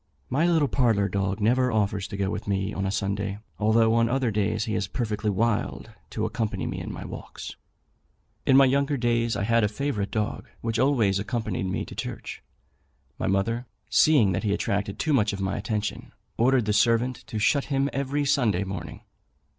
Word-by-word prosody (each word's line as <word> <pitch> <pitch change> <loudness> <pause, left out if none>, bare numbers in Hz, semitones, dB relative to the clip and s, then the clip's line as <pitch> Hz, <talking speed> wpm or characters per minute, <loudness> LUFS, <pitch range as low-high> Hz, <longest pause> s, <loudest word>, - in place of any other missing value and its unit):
My 150 +7 +2
little 160 -4 +3
parlour 115 -7 +2
dog 100 0 -1
never 125 +4 +2
offers 100 -3 0
to 100 - -6
go 100 0 0
with - - -5
me 100 +1 -1
on 95 0 -2
a - - -1
Sunday, 100 0 -2 0.2
although 110 +1 +4
on 115 0 +3
other 130 -2 +1
days 105 +1 0
he 110 - -3
is 100 - -1
perfectly 105 -2 -2
wild 95 -10 -1 0.2
to - - -2
accompany 110 -3 -2
me - - -3
in - - -5
my - - -7
walks. - - -8 0.9
In 135 - +5
my 135 - +8
younger 140 +2 +1
days 120 -1 +1
I - - -1
had 115 +1 +3
a - - +4
favourite 105 -2 -2
dog, 110 0 -3
which 115 -1 -1
always 115 -8 +3
accompanied 110 -3 -2
me 95 - -2
to - - -10
church. - - -6 0.8
My - - -1
mother, 115 +6 0 0.2
seeing 140 -11 +5
that 95 +2 -1
he 105 -2 +1
attracted 100 0 -2
too 155 - 0
much 105 -6 +2
of 100 - -5
my 95 0 -1
attention, 105 0 -3 0.2
ordered 125 0 +3
the 105 - +1
servant 115 +3 +2
to 110 - -5
shut 135 +6 +2
him 140 -1 +1
every 140 +2 -1
Sunday 115 -10 +2
morning. 90 -5 -6
110 Hz, 190 wpm, -26 LUFS, 100-125 Hz, 0.9 s, my